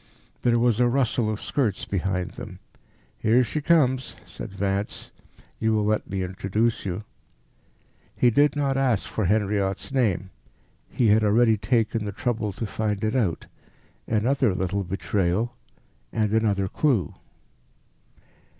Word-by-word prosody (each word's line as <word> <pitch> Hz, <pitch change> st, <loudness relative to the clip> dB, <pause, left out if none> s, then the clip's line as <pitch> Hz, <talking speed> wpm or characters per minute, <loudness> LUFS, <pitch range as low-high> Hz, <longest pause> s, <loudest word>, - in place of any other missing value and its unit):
There 120 Hz, -1 st, +3 dB
was 120 Hz, -1 st, +2 dB
a 125 Hz, -, +4 dB
rustle 120 Hz, -3 st, +1 dB
of 110 Hz, -1 st, -2 dB
skirts 115 Hz, -9 st, -1 dB
behind 95 Hz, -2 st, -2 dB
them. -, -, -9 dB, 0.6 s
"Here 120 Hz, +4 st, +4 dB
she 150 Hz, +5 st, -3 dB
comes," 130 Hz, -5 st, +2 dB
said -, -, -8 dB
Vance; 100 Hz, +1 st, -3 dB, 0.5 s
"you 110 Hz, 0 st, +1 dB
will 105 Hz, -1 st, +1 dB
let 105 Hz, 0 st, 0 dB
me 95 Hz, -1 st, -2 dB
introduce 100 Hz, +5 st, -1 dB
you." 90 Hz, +3 st, -3 dB, 1.1 s
He 120 Hz, -, +4 dB
did 145 Hz, +5 st, +3 dB
not 140 Hz, -2 st, 0 dB
ask 125 Hz, -7 st, +1 dB
for 110 Hz, -, -2 dB
Henriot's 100 Hz, +2 st, 0 dB
name; 100 Hz, -8 st, 0 dB, 0.6 s
he 120 Hz, -4 st, +2 dB
had 110 Hz, +1 st, +4 dB
already 110 Hz, +2 st, +4 dB
taken 110 Hz, +1 st, 0 dB
the 100 Hz, -, -3 dB
trouble 110 Hz, 0 st, -2 dB
to 105 Hz, +5 st, -5 dB
find 105 Hz, -1 st, -2 dB
it 110 Hz, +3 st, 0 dB
out 100 Hz, -11 st, 0 dB, 0.6 s
another 115 Hz, -1 st, +1 dB
little 95 Hz, +2 st, -1 dB
betrayal, 95 Hz, +4 st, -1 dB, 0.6 s
and 110 Hz, -2 st, 0 dB
another 105 Hz, -4 st, +2 dB
clue. 110 Hz, -, +1 dB
110 Hz, 135 wpm, -25 LUFS, 100-120 Hz, 1.1 s, a